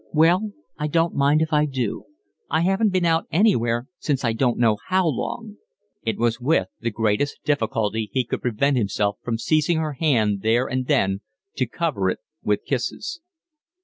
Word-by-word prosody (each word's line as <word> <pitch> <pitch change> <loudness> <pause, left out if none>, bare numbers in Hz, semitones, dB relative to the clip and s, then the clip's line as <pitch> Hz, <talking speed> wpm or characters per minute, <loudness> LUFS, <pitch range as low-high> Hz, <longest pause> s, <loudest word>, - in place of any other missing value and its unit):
"Well, 175 +7 +3 0.3
I 150 - 0
don't 165 +2 +1
mind 145 +3 +3
if 160 0 -4
I 150 0 +3
do. 130 -6 -3 0.4
I 160 - +2
haven't 195 +5 +2
been 185 -2 +1
out 165 0 +2
anywhere 120 - +2
since 135 -4 -1
I 115 - +2
don't 120 +1 +1
know 110 -3 +3
how 185 0 +2
long." 210 - -3 0.5
It 110 - -1
was 120 +1 0
with 125 - +2
the 115 - -1
greatest 110 +5 0
difficulty 110 -6 0
he 130 - +1
could - - -3
prevent 125 +4 +1
himself 105 -2 0
from 115 -2 -2
seizing 155 +6 +2
her 155 -2 -1
hand 115 -9 +1
there 115 +4 +2
and 130 0 -2
then 95 +1 +2 0.4
to - - +1
cover - - -1
it - - -1 0.2
with - - 0
kisses. 340 - -3
135 Hz, 175 wpm, -23 LUFS, 115-160 Hz, 0.5 s, Well